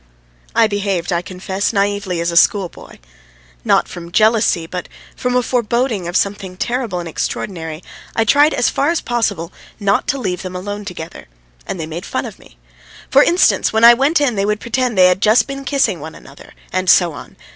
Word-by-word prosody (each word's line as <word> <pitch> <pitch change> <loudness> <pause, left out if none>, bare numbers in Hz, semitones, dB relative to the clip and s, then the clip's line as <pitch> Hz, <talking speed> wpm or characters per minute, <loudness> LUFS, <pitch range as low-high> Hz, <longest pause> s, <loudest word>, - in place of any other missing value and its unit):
I 230 - +5
behaved, 200 -4 -1
I 170 - 0
confess, 190 +2 -4
as - - -1
naïvely 200 -3 -1
as 170 - -1
a - - -5
schoolboy. 190 +1 +1 0.7
Not - - +2
from 170 -1 -9
jealousy, 215 -4 +3
but 180 +2 -6 0.3
from 250 0 -2
a 250 - +2
foreboding 235 -4 -1
of 175 - 0
something 195 -2 -2
terrible 240 -5 -2
and 170 - -6
extraordinary, 160 0 -4 0.3
I 225 - +2
tried 290 +6 +4
as - - +2
far 280 - +1
as 335 -1 +1
possible 205 -8 -2 0.3
not 200 -1 +1
to 275 - 0
leave 180 -9 -3
them 185 -1 -7
alone 205 +3 -5
together, 170 -4 -8 0.4
and 185 - -4
they 160 - -3
made 165 +3 -7
fun - - -3
of - - -9
me. - - -19 0.5
For - - +6
instance, 350 +2 +3
when 220 +1 +1
I 235 +1 +10
went 280 +6 +2
in 285 -4 +1
they 200 -1 -1
would 210 0 0
pretend 235 -1 -1
they 185 - +7
had 180 +1 +3
just 220 +3 +4
been 275 0 -7
kissing 275 -1 +1
one - - -9
another, - - -15 0.2
and 185 -1 0
so 175 -3 +5
on. - - -11
205 Hz, 200 wpm, -17 LUFS, 180-240 Hz, 0.7 s, I